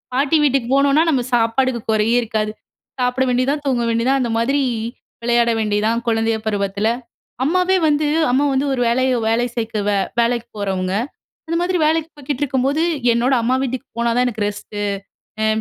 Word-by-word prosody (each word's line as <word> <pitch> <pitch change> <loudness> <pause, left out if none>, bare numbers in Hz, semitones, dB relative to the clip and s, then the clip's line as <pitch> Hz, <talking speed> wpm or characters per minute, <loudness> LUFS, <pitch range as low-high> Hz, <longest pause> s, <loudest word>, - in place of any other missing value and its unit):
பாட்டி 285 +4 +3
வீட்டுக்கு 270 -4 +1
போனோம்னா 280 +3 +4
நம்ம 250 -4 0
சாப்பாடுக்கு 235 +1 +1
குறையே 220 +2 +2
இருக்காது! 215 -1 -2 0.5
சாப்பிட 250 +1 +1
வேண்டியது 255 +2 +1
தான், 290 -1 -5
தூங்க 245 -3 +1
வேண்டியதுதான். 245 +4 +1
அந்த 235 - -2
மாதிரி 275 +5 +1 0.6
விளையாட 235 0 +3
வேண்டியது 210 0 0
தான். 235 +1 0
குழந்தைய 225 0 +1
பருவத்துல. 200 0 -1 0.6
அம்மாவே 365 +4 +2
வந்து 295 0 +2 0.2
அம்மா 275 +3 +2
வந்து 265 +2 +1
ஒரு 245 - -1
வேலைய 255 +2 +2 0.2
வேலை 240 +2 +1
சேர்க்கவ 220 -3 -2 0.3
வேலைக்கு 235 0 0
போறவங்க. 190 -2 -2 0.5
அந்த 335 - -2
மாதிரி 360 +1 0
வேலைக்கு 320 0 0
போய்கிட்டு 285 0 -4
இருக்கும்போது 275 +3 0 0.3
என்னோட 240 +3 +1
அம்மா 250 +3 +1
வீட்டுக்கு 260 +1 -4
போனா 235 0 +1
தான் 250 +1 +3
எனக்கு 220 -3 -3
ரெஸ்ட்டு 205 0 -6 0.6
எ - - +3
245 Hz, 160 wpm, -19 LUFS, 225-275 Hz, 0.6 s, போனோம்னா